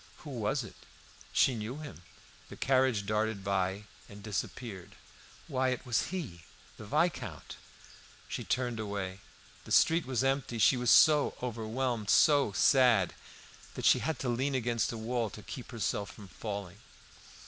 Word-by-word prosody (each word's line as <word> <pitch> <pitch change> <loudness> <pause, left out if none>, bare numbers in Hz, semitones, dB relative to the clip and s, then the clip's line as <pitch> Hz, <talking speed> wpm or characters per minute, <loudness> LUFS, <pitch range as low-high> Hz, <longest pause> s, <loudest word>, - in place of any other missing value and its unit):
Who 150 - -8
was 120 +2 -1
it? - - -10 0.6
She 130 - +4
knew 115 +4 -5
him. 150 - -9 0.5
The - - -9
carriage 130 -5 +2
darted 105 -1 -1
by 95 0 -1 0.3
and 100 0 -12
disappeared. 100 -2 -5 0.5
Why, 130 0 0
it 125 +1 -3
was 125 -2 0
he 145 - -5 0.4
the 110 - -10
Viscount. 145 - -1 0.7
She - - -4
turned 120 -3 -1
away; 100 -3 -4 0.4
the - - -12
street 165 -3 +4
was 130 -1 0
empty. 135 -3 0
She 110 +4 +5
was 125 -1 0
so 150 -2 +6
overwhelmed, 115 -1 -2
so 145 -7 +5
sad, 120 -4 +4 0.6
that - - -4
she - - +6
had 160 - -2
to 130 - -3
lean 130 +3 0
against 120 -2 0
a 115 - -5
wall 115 0 -2
to 105 - -11
keep 125 - -8
herself 105 -3 -2
from 105 - -12
falling. 100 -3 -6
115 Hz, 150 wpm, -31 LUFS, 105-130 Hz, 0.7 s, so